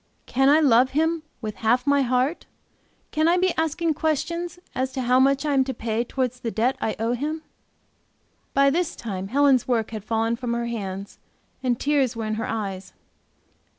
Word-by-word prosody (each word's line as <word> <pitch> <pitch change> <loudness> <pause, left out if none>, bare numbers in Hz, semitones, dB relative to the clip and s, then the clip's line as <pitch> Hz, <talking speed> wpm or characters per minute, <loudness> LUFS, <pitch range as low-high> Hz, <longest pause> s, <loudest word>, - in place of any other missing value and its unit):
Can 270 +2 +2
I 300 +2 +6
love 260 -3 +4
Him 325 +1 +2 0.2
with 215 -2 -5
half 240 +3 +2
my 285 0 +3
heart? 255 +5 0 0.6
Can 310 +1 +2
I 345 +2 +4
be 365 -1 +2
asking 320 +1 0
questions 320 +3 -2 0.2
as 260 +1 -1
to 260 - -2
how 250 +1 +4
much 275 +2 +3
I 295 - +1
am 270 -1 +4
to 265 - -4
pay 225 +1 -1
towards 250 0 -2
the 240 - -3
debt 235 +4 +1
I 220 - -1
owe 230 +2 0
Him?" 305 +5 -3 1.1
By 275 0 +5
this 345 +2 -1
time 195 -4 -5
Helen's 270 +1 +3
work 230 -4 0
had 215 -3 -6
fallen 225 +1 0
from 240 -1 -3
her 235 0 -2
hands 200 -4 -5 0.4
and 250 -3 0
tears 275 -4 +1
were 225 -1 -3
in 215 - -2
her - - -3
eyes. 195 -4 -4
255 Hz, 185 wpm, -24 LUFS, 230-290 Hz, 1.1 s, I